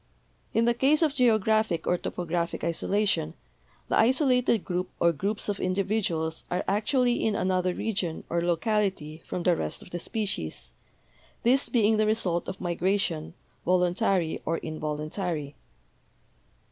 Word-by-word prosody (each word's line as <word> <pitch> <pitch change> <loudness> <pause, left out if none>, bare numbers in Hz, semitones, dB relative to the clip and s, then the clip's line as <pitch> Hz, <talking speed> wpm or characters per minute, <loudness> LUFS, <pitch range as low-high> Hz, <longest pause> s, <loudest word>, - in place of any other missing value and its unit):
In 230 - +2
the 240 - +4
case 280 +6 +3
of 305 -3 +2
geo 245 -6 +4
graphic 215 -5 +1
or 180 - +2
topographic 170 -1 -3
isolation 170 -1 0 0.5
the - - +2
isolated 250 - +3
group 180 +1 -2
or 170 - +4
groups 200 +7 -3
of 205 -1 -2
individuals 185 -4 -1
are 180 - -1
actually 240 +4 +1
in 220 -2 +1
another 185 -2 +1
region 190 -7 -2
or 170 0 0
locality 175 -3 0
from 180 - -3
the 180 -1 +4
rest - - -4
of - - -15
the 175 - -3
species, 195 - -3 0.7
this 260 +4 +3
being 220 -3 +3
the 215 0 +2
result 185 -6 +1
of 190 - -5
migration, 175 -2 -1 0.3
voluntary 180 -1 +1
or 165 +1 -1
involuntary. 155 0 -4
185 Hz, 135 wpm, -27 LUFS, 170-220 Hz, 0.7 s, the